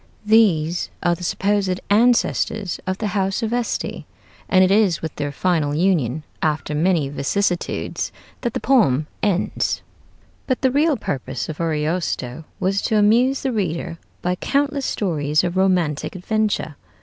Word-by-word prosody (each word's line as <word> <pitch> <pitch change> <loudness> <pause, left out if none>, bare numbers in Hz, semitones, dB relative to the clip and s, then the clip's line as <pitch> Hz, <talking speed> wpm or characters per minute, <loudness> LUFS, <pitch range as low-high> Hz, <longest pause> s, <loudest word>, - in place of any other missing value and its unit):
These 180 -7 +3
are 175 - +3
the 175 - -6
supposed 195 0 0
ancestors 220 -3 +2
of 185 0 -1
the 215 0 -2
house 195 +2 0
of 225 +1 -1
Este, 245 -1 -2 0.5
and 185 -1 +5
it 185 - +3
is 200 -5 +3
with 160 - -4
their 145 -1 -2
final 150 -2 0
union, 155 -5 +1 0.2
after 150 -1 -1
many 160 -1 +2
vicissitudes, 175 +6 -1 0.3
that 240 -2 -2
the - - 0
poem 175 - +3 0.2
ends. 200 -3 0 0.6
But 255 -2 0
the 260 - +4
real 295 +2 +2
purpose 130 - -4
of 155 +1 -5
Ariosto 155 -3 -2
was 195 +2 +1
to 220 - +1
amuse 235 +6 +3
the 265 - 0
reader 170 -5 -2 0.2
by 180 - +1
countless 280 +7 0
stories 150 -6 0
of 175 0 -2
romantic 180 -5 +1
adventure. 200 -6 -1
185 Hz, 145 wpm, -21 LUFS, 155-215 Hz, 0.6 s, and